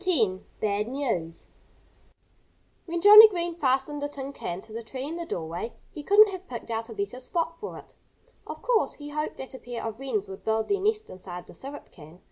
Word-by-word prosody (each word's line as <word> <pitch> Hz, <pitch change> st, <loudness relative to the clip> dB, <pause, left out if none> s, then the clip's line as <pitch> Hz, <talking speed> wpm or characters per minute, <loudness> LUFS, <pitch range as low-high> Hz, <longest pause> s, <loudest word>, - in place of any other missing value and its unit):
X -, -, -10 dB, 0.5 s
BAD 210 Hz, 0 st, 0 dB
NEWS 230 Hz, -, -2 dB, 1.4 s
When 340 Hz, 0 st, -2 dB
Johnnie 420 Hz, +3 st, +12 dB
Green 345 Hz, -3 st, -2 dB
fastened 275 Hz, -1 st, 0 dB
the 290 Hz, -, -2 dB
tin 280 Hz, -1 st, -6 dB
can 175 Hz, -7 st, -5 dB
to 220 Hz, +1 st, -13 dB
the 230 Hz, -, -4 dB
tree 255 Hz, +3 st, -6 dB
in 320 Hz, -, -4 dB
the 340 Hz, -1 st, -5 dB
dooryard 170 Hz, +6 st, -4 dB, 0.2 s
he 300 Hz, -, -7 dB
couldn't 410 Hz, +6 st, +6 dB
have 375 Hz, 0 st, -8 dB
picked 235 Hz, -3 st, -7 dB
out 225 Hz, +1 st, -3 dB
a -, -, -7 dB
better 200 Hz, +5 st, -3 dB
spot 330 Hz, +5 st, -2 dB
for 435 Hz, -, -6 dB
it. -, -, -15 dB, 0.5 s
Of -, -, -8 dB
course, 480 Hz, -3 st, +2 dB
he 290 Hz, 0 st, -8 dB
hoped 300 Hz, +1 st, -3 dB
that 265 Hz, -, -8 dB
a 260 Hz, -, -8 dB
pair 240 Hz, -1 st, -6 dB
of 225 Hz, +1 st, -5 dB
wrens 230 Hz, -7 st, -2 dB
would 190 Hz, 0 st, -9 dB
build 220 Hz, 0 st, 0 dB
their 400 Hz, -1 st, +1 dB
nest 430 Hz, +1 st, 0 dB
inside 180 Hz, -1 st, -8 dB
the -, -, -14 dB
syrup 280 Hz, +2 st, -9 dB
can. 160 Hz, +1 st, -14 dB
265 Hz, 210 wpm, -27 LUFS, 220-335 Hz, 1.4 s, Johnnie